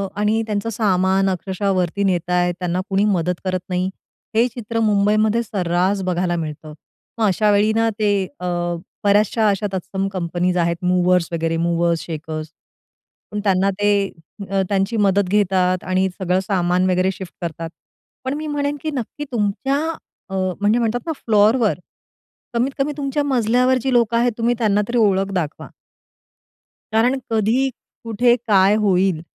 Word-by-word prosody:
आणि 210 +2 +1
त्यांचं 210 +1 -2
सामान 195 -3 +2
अक्षरशः 190 +2 -2
वरती 185 +2 0
नेताय, 180 -1 +1
त्यांना 180 0 -1
कुणी 195 +1 +2
मदत 180 0 -1
करत 185 0 0
नाही, 180 +1 0 0.5
हे 230 +2 +4
चित्र 230 -2 -4
मुंबईमध्ये 215 +1 +2
सर्रास 185 -1 0
बघायला 175 0 0
मिळतं. 155 -2 -6 0.4
मग 225 - +2
अशावेळी 205 +2 +3
ना, 225 0 +3
ते 210 -1 +2 0.3
अ, - - -5 0.6
बऱ्याचशा 210 +2 +3
अशा 205 +1 0
तत्सम 190 +1 -2
कंपनीज 180 0 -1
आहेत, 170 -1 +1
मूव्हर्स 180 -1 +3
वगैरे 165 0 -1
मूव्हर्स 170 0 +1
शेकर्स 155 -1 -5 0.8
पण 210 - -3
त्यांना, 195 -1 +2
ते 205 - +3 0.6
अ, 195 -1 +1
त्यांची 200 +3 0
मदत 200 -2 +2
घेतात 185 -3 +2
आणि 185 +1 +1
सगळं 185 -1 +1
सामान 185 -2 +1
वगैरे 185 +1 +2
शिफ्ट 190 -1 -9
करतात. 165 -1 -4 0.6
पण, 260 - -1
मी 305 +1 -4
म्हणेन 290 0 -1
की 310 - -3
नक्की 270 +4 -5
तुमच्या 235 +5 0 0.5
अ, - - -8 0.3
म्हणजे 215 +4 +3
म्हणतात 235 +1 0
ना, 325 - -2
फ्लोरवर 215 0 +3 0.7
कमीत 240 +3 +1
कमी 280 +1 0
तुमच्या 285 0 -1
मजल्यावर 250 -1 +2
जी 265 0 -1
लोकं 235 -1 +3
आहेत, 245 +1 +2
तुम्ही 235 +1 +1
त्यांना 210 -3 +2
तरी 240 - -1
ओळख 195 -3 +2
दाखवा. 165 -5 -3 1.2
कारण 245 +4 +3
कधी 225 +5 +2 0.3
कुठे, 235 +2 +3
काय 195 -1 +5
होईल, 190 -5 +2
200 Hz, 145 wpm, -20 LUFS, 180-225 Hz, 1.2 s, काय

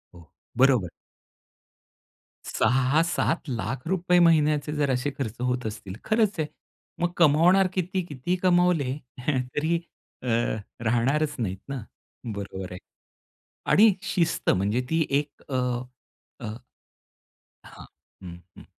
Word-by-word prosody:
हो, 85 -3 -16 0.3
बरोबर. 125 -9 +4 1.6
₹6-700000 150 - +1
महिन्याचे 155 -3 +3
जर 145 -2 +1
असे 130 +3 0
खर्च 115 -5 -3
होत 125 -1 -1
असतील, 105 -3 -7
तर - - -15
खरंच 215 -4 +2
आहे, 155 - 0 0.5
मग 175 0 +1
कमावणार 170 +4 +5
किती? 185 +1 -1
किती 150 +3 -2
कमावले 175 -7 +3 0.3
तरी 150 +5 0 0.4
अ, - - -5 0.6
राहणारच 135 +7 +1
नाहीत 95 -5 -2
ना. 135 -5 -4 0.5
बरोबर 95 -2 -6
आहे. 90 - -7 0.9
आणि 215 0 +7
शिस्त 175 -4 0
म्हणजे 100 +6 +2
ती 160 -1 +2
1 140 +1 -1
अ, 130 - -2 0.8
अ, - - -7 1.2
हां. - - -12 0.4
हं, 85 -2 -8 0.2
हं. - - -12
145 Hz, 110 wpm, -26 LUFS, 120-170 Hz, 1.6 s, आणि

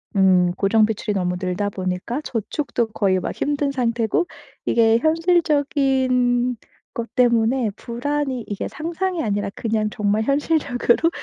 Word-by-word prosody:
음 185 -2 +4
고정비출이 215 +1 +1
너무 180 -2 -1
늘다 185 +2 -1
보니까 185 +7 -3
저축도 235 0 -2
거의 190 -4 +2
막 - - -4
힘든 290 -1 -1
상태고 240 - 0 0.4
이게 225 -1 +4
현실적인 270 -6 +2 0.4
것 235 0 -5
때문에 235 -1 +2
불안이 260 +1 -3
이게 205 - -4
상상이 340 +2 -3
아니라 205 -2 -1
그냥 215 -2 -1
정말 210 0 0
현실적으로 280 0 +1
235 Hz, 290 characters per minute, -22 LUFS, 210-285 Hz, 0.4 s, 음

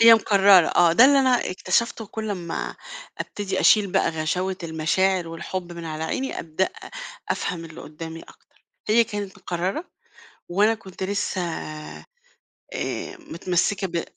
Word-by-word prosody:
هي 230 0 +10
مقررة، 200 -5 +6
آه، 170 -1 +4
ده 225 +9 +7
اللي 280 +1 +6
أنا 255 -5 +2
اكتشفته، 215 +5 0
كل 220 +1 -5
اما 175 -4 -4 0.4
أبتدي 195 -2 -3
أشيل 205 -4 +5
بقى - - +3
غشاوة 180 +4 -1
المشاعر 170 +3 +1
والحب 175 +2 -5
من 170 -1 -8
على 155 0 -4
عيني، 265 +11 -2
أبدأ 165 +4 -1 0.6
أفهم 175 -3 -2
اللي 160 -1 -10
قدامي 160 +1 -8
أكتر، - - -21 0.2
هي 230 +2 +5
كانت 205 -3 -6
مقررة، 185 - -3 0.6
وأنا 205 +5 +3
كنت 190 -4 -11
لسه 195 0 -1
آآ 165 - -7 1.0
متمسكة 185 - -1
ب 170 -1 -2
185 Hz, 135 wpm, -24 LUFS, 165-205 Hz, 1.0 s, هي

